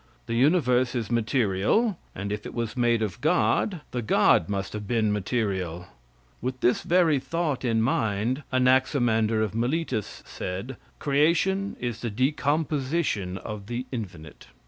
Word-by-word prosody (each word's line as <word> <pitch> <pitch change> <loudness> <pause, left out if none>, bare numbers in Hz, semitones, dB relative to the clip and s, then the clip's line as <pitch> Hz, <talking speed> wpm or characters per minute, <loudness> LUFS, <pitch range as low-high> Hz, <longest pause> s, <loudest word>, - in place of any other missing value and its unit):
The 115 - -4
universe 130 -2 +3
is 120 -2 -2
material, 120 - +1 0.2
and 100 +2 -4
if 105 0 -4
it - - -9
was 115 -1 -3
made 120 -2 +2
of 105 -4 -4
god, 175 +3 +2
the 125 - -2
god 105 -6 +3
must 100 -1 -3
have 105 -1 -5
been 110 -2 +1
material. 95 -5 -2 0.5
With 130 +1 -3
this 125 - +3
very 170 -5 +3
thought 150 0 -2
in 115 -3 +1
his 110 - +3
mind, 115 +2 0
Anaximander 125 -4 +3
of 105 - -3
Miletus 120 -1 -2
said: 100 +8 -5 0.2
"Creation 170 +7 +1
is 120 -2 -4
the 120 - -2
decomposition 140 - 0
of 100 +1 -7
the 120 +2 -3
infinite." 90 - -7
120 Hz, 145 wpm, -26 LUFS, 105-140 Hz, 0.5 s, universe